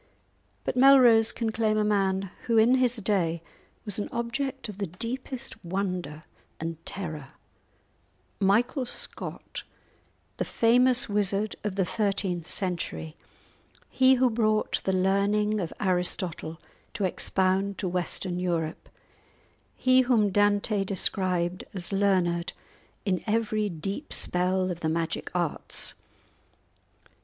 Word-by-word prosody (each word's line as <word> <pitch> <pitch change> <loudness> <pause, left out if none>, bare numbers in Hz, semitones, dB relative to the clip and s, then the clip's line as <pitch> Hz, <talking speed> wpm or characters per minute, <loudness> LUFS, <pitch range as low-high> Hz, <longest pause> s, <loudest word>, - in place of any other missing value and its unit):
But - - -2
Melrose 250 -4 +6
can 225 -2 -2
claim 220 -1 +1
a 215 - +2
man 195 -2 0 0.2
who 230 -1 +2
in 225 +3 +5
his 255 -2 +3
day 185 -6 0 0.4
was 210 -1 -1
an 205 - -3
object 260 +3 -3
of 210 -2 -9
the 200 - -2
deepest 245 - -6
wonder 180 -4 -3 0.4
and 165 0 -5
terror—Michael 190 - -4
Scott, - - -6 0.8
the - - 0
famous 245 +2 +3
wizard 205 0 0
of 210 -3 -3
the 195 -2 +1
thirteenth 195 -5 -1
century, 170 -4 -3 0.8
he 260 0 +5
who 255 -1 +3
brought 215 -1 +1
the 190 - +2
learning 200 +3 +1
of 170 -4 -3
Aristotle 180 -3 -1 0.4
to 205 - -2
expound 190 +2 0
to 190 - -2
Western 180 0 -2
Europe, 170 -3 -2 0.9
he 255 0 +4
whom 230 -5 +2
Dante 205 +1 +2
described 185 -2 +1
as 180 0 -4
learned 185 -4 +1 0.5
in 185 -3 0
every 215 -1 0
deep 195 - -5
spell 185 +1 +2
of 170 - -5
the 160 - -1
magic 165 0 -2
arts. 175 -4 0
195 Hz, 115 wpm, -27 LUFS, 180-225 Hz, 0.9 s, Melrose